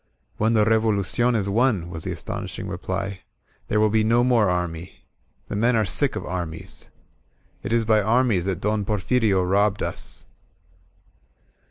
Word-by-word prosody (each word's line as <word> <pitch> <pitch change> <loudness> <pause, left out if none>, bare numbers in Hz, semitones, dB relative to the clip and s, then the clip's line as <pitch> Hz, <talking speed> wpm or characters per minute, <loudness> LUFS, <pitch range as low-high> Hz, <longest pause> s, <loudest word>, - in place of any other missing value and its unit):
^^When 110 +2 +2
the 105 -1 +4
Revolucion 110 +2 +2
is 100 -3 0
won," 105 -4 +1
was 80 -2 -5
the - - -2
astonishing - - -5
reply, 95 +2 -4 0.5
"there 105 - +1
will 105 -1 +3
be 110 0 +2
no 115 +2 +3
more 120 -5 +3
army. 90 -1 -4 0.4
The - - -5
men 115 +4 +2
are 110 -1 +2
sick - - +1
of - - -4
armies* 85 -3 -6 0.7
It - - -5
is 115 -1 +2
by 110 -1 +3
armies 110 -4 +2
that 95 -2 -2
Don 105 0 0
Porfirio 105 0 +1
robbed 100 +2 +1
us." - - -6
105 Hz, 155 wpm, -23 LUFS, 95-115 Hz, 0.7 s, the